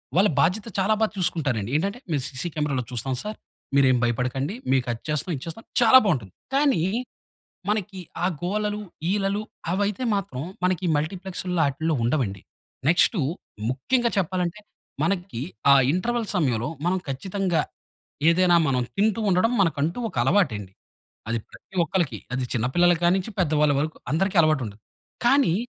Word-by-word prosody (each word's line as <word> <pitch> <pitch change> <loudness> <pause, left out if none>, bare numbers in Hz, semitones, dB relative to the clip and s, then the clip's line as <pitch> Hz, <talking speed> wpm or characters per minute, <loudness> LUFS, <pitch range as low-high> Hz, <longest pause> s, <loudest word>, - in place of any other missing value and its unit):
వాళ్ళ 195 +4 +5
బాధ్యత 195 +7 +2
చాలా 195 +3 +3
బా 220 - +6
చూసుకుంటారండి. 135 - 0
ఏంటంటే, 200 +9 0
మీరు 145 -3 +1
సీసీ 140 +6 -3
కెమెరాలో 145 -4 -1
చూస్తాం 125 +2 -2
సార్, 210 0 -5 0.4
మీరేం 130 -2 +5
భయపడకండి, 125 - -1 0.2
మీకు 130 -2 +2
అది 115 - -5
చేస్తాం, 150 +4 -1
ఇది 135 - -7
చేస్తాం 165 +7 -7 0.2
చాలా 240 +2 +8
బావుంటుంది. 130 - -1 0.2
కానీ, 275 - +3 0.9
మనకి 205 -2 -1 0.2
ఆ - - +4 0.2
గోలలు, 210 +3 -1 0.3
ఈలలు 200 0 0 0.3
అవి 190 +3 +1
అయితే 210 +4 -3
మాత్రం 155 -10 -3 0.2
మనకి 180 0 +1
మల్టీప్లెక్స్‌ల్లో 180 +2 -2
ఆటిల్లో 155 +3 -1
ఉండవండి. 115 -7 0 0.5
నెక్స్టు 175 +3 +4 0.5
ముఖ్యంగా 235 - +1
చెప్పాలంటే, 180 +2 -1 0.4
మనకి 180 -10 -2 0.3
ఆ - - +9 0.2
ఇంటర్వల్ 230 +6 -1
సమయంలో 125 -8 +1 0.2
మనం 185 +1 +2
ఖచ్చితంగా, 180 +3 -1 0.7
ఏదైనా 175 0 +4
మనం 125 -2 +1
తింటూ 215 +2 +2
ఉండడం, 185 +6 +3
మనకంటూ 165 +2 +1
ఒక - - -13
అలవాటండి. 120 - +1 0.6
అది 115 +1 0
ప్రతి 190 - -15
ఒక్కళ్లకి, 160 - -1 0.2
అది 130 0 -1
చిన్న 120 -1 +1
పిల్లల 175 0 +5
కానించి, 185 +4 +2
పెద్ద 165 -4 +1
వాళ్ళ 150 -1 +4
వరకు 155 +1 -2
అందరికీ 190 +5 +1
అలవాటుంటది. 130 -10 0 0.5
కానీ, 270 -8 +4
175 Hz, 140 wpm, -24 LUFS, 135-195 Hz, 0.9 s, ఆ